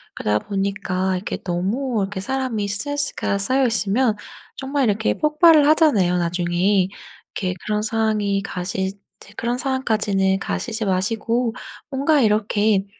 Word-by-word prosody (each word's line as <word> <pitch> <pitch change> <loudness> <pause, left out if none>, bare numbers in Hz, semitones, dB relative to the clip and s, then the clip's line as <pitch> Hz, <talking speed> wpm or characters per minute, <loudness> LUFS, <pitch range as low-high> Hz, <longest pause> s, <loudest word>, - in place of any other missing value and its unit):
그러다 105 0 0
보니까 190 -2 -1
이게 185 - -4
너무 210 +8 -2
이렇게 195 0 -3
사람이 240 -2 -2
스트레스가 285 0 -1
쌓여 260 +6 +2
있으면 225 +1 +1 0.4
정말 275 0 -1
이렇게 215 +2 +1
폭발을 305 0 +5
하잖아요 225 - +4
나중에. 175 +2 +1 0.5
이렇게 185 -2 -1
그런 210 0 0
상황이 215 -2 0
가시 190 +1 -3 0.3
제 205 - -16
그런 240 +1 -1
상황까지는 210 -8 0
가시지 220 +2 -3
마시고 225 +5 0 0.4
뭔가 280 +1 +2
이렇게 210 -2 +2
210 Hz, 325 characters per minute, -21 LUFS, 195-255 Hz, 0.5 s, 폭발을